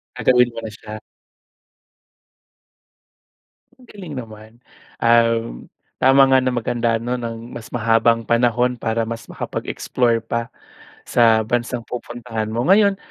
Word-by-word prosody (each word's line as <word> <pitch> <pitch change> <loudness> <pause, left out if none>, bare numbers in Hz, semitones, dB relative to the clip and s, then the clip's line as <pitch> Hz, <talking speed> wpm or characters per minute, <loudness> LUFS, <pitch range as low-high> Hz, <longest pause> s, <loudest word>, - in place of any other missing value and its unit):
Gagawin 125 -1 +3
mo 115 - -7
na 110 - -6
siya. 110 0 -10 2.8
Ang 250 - -19
galing 185 -7 -10
naman. 110 -2 -11 0.5
Um, 115 - +2 0.3
tama 135 +1 +6
nga 130 0 +5
na 130 0 0
maghanda, 120 -1 0
'no, 120 +2 -3
ng 115 -1 -7
mas 120 -2 -9
mahabang 115 0 +2
panahon 120 +1 +2
para 115 -1 -2
mas 115 0 -6
makapag-explore 120 -2 -2
pa 115 +1 -3 0.6
sa 115 -2 +3
bansang 120 +1 -2
pupuntahan 120 -2 -5
mo. 120 +2 -1
Ngayon, 200 0 +4
115 Hz, 120 wpm, -20 LUFS, 115-125 Hz, 2.8 s, tama